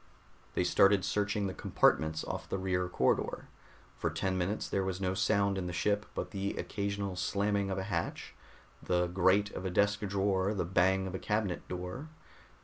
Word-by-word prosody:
They -, -, +2 dB
started 100 Hz, -1 st, +4 dB
searching 105 Hz, 0 st, 0 dB
the 95 Hz, -, -2 dB
compartments 80 Hz, -2 st, +2 dB
off -, -, -5 dB
the -, -, -1 dB
rear 90 Hz, -1 st, -1 dB
corridor. -, -, 0 dB, 0.5 s
For -, -, 0 dB
ten 95 Hz, -1 st, -1 dB
minutes 95 Hz, +4 st, -1 dB
there 95 Hz, -, 0 dB
was 95 Hz, -1 st, -2 dB
no 95 Hz, -1 st, 0 dB
sound 100 Hz, 0 st, +2 dB
in 90 Hz, -, -3 dB
the 90 Hz, -, -4 dB
ship 105 Hz, +4 st, 0 dB
but -, -, -3 dB
the 100 Hz, -1 st, -2 dB
occasional 100 Hz, -1 st, -3 dB
slamming 100 Hz, +2 st, 0 dB
of 95 Hz, -, -2 dB
a 95 Hz, -, -1 dB
hatch, 100 Hz, +1 st, -3 dB, 0.5 s
the 90 Hz, 0 st, +1 dB
grate 95 Hz, +3 st, +3 dB
of -, -, -6 dB
a 95 Hz, -, -1 dB
desk 100 Hz, +3 st, +2 dB
drawer, 100 Hz, 0 st, 0 dB
the 95 Hz, -, -1 dB
bang 95 Hz, +2 st, +2 dB
of 95 Hz, -, -5 dB
a 95 Hz, -, -3 dB
cabinet 105 Hz, -4 st, -1 dB
door. 90 Hz, -, -5 dB
95 Hz, 180 wpm, -32 LUFS, 90-100 Hz, 0.5 s, started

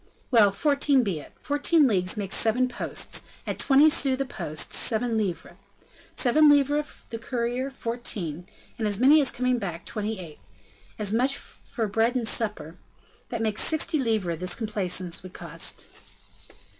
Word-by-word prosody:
"Well! 220 Hz, -5 st, +6 dB
fourteen 280 Hz, +3 st, +3 dB
be 190 Hz, -8 st, -2 dB
it; -, -, -13 dB
fourteen 290 Hz, +2 st, +3 dB
leagues 185 Hz, -3 st, 0 dB
makes 200 Hz, -2 st, -2 dB
seven 240 Hz, +3 st, +2 dB
posts; 250 Hz, -, -3 dB, 0.2 s
at -, -, -4 dB
twenty 285 Hz, +2 st, +5 dB
sous 275 Hz, -3 st, +1 dB
the 275 Hz, -, -1 dB
post, 155 Hz, -, -4 dB
seven 230 Hz, +1 st, +1 dB
livres; 200 Hz, -6 st, -3 dB, 0.6 s
seven 295 Hz, +4 st, +5 dB
livres 290 Hz, +1 st, +1 dB
the 230 Hz, -, -4 dB
courier, 245 Hz, +2 st, -2 dB
fourteen; 210 Hz, -, -4 dB, 0.3 s
as 210 Hz, -3 st, 0 dB
many 290 Hz, +4 st, +6 dB
for 265 Hz, -, +1 dB
coming 250 Hz, 0 st, 0 dB
back, 170 Hz, -5 st, -5 dB
twenty 215 Hz, 0 st, -3 dB
eight! 165 Hz, -5 st, -10 dB, 0.6 s
as 210 Hz, -1 st, -2 dB
much 260 Hz, +4 st, +1 dB
for 230 Hz, -, -5 dB
bed 225 Hz, +4 st, +1 dB
and 240 Hz, -3 st, 0 dB
supper, 180 Hz, -9 st, -2 dB, 0.5 s
that 235 Hz, -2 st, -3 dB
makes 215 Hz, -1 st, 0 dB
sixty 315 Hz, -1 st, +1 dB
livres 215 Hz, -, 0 dB
this 180 Hz, 0 st, -2 dB
complaisance 185 Hz, -5 st, -2 dB
would 185 Hz, 0 st, -11 dB
cost." -, -, -1 dB
230 Hz, 150 wpm, -26 LUFS, 195-265 Hz, 0.6 s, Well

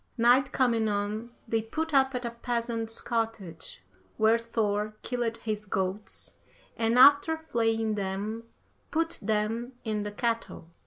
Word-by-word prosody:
Night 245 Hz, +3 st, +5 dB
coming 230 Hz, -4 st, +2 dB
on, 210 Hz, +3 st, -2 dB, 0.2 s
they 225 Hz, 0 st, +1 dB
put 315 Hz, +8 st, -3 dB
up 265 Hz, -1 st, +4 dB
at 250 Hz, 0 st, -3 dB
a 235 Hz, -, -2 dB
peasant's 235 Hz, -1 st, -2 dB
cottage, 225 Hz, -8 st, -3 dB, 0.3 s
where 220 Hz, +1 st, +4 dB
Thor 215 Hz, -2 st, -1 dB
killed 240 Hz, -2 st, -1 dB
his 210 Hz, -1 st, -4 dB
goats, 190 Hz, +2 st, -3 dB, 0.4 s
and 230 Hz, +1 st, +1 dB
after 285 Hz, +5 st, +7 dB
flaying 225 Hz, -7 st, 0 dB
them, 205 Hz, +3 st, -3 dB, 0.4 s
put 330 Hz, +1 st, -1 dB
them 220 Hz, +4 st, -1 dB
in 215 Hz, -2 st, -1 dB
the 205 Hz, 0 st, -4 dB
kettle. 230 Hz, -6 st, -2 dB
225 Hz, 135 wpm, -28 LUFS, 210-240 Hz, 0.4 s, after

